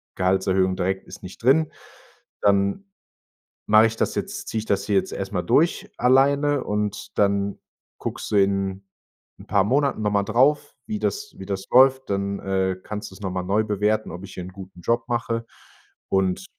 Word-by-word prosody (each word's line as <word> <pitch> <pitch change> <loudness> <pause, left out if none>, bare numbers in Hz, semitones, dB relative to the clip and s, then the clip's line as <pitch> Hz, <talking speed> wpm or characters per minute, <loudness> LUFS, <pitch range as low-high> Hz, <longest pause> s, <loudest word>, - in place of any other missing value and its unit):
Gehaltserhöhung 95 0 +1
direkt 95 +1 -2
ist - - -11
nicht 90 - -10
drin, 145 +6 +3 0.7
dann 100 - +2 0.8
mache 110 +1 +7
ich 115 - -5
das - - 0
jetzt - - -4
ziehe 110 - -1
ich 110 - -5
das 100 -2 0
hier 100 - 0
jetzt - - -1
erstmal 95 -2 -3
durch, 175 - +2
alleine“. 140 +3 +3
Und 105 0 -3
dann 100 0 +1 0.4
guckst - - -5
du - - +1
in 95 0 +1 0.6
'n - - -13
paar 100 -2 +3
Monaten 140 +1 +1
nochmal 105 -1 +1
drauf, 135 +7 +2
wie 215 -1 -3
das 425 - -3
wie - - -8
das 95 -1 -3
läuft, 130 0 +5
dann, 100 0 -1
äh, 95 -1 0
kannst 105 -2 -6
du - - -12
es 105 - -15
nochmal 95 -1 -3
neu 105 +3 +2
bewerten: 105 0 0
„Ob 90 +3 -8
ich 95 - -12
hier 90 - -5
'nen 90 - -9
guten 95 -2 -11
Job 115 +4 0
mache”, 115 -1 -1 0.6
und 95 - +1
100 Hz, 175 wpm, -23 LUFS, 95-120 Hz, 0.8 s, mache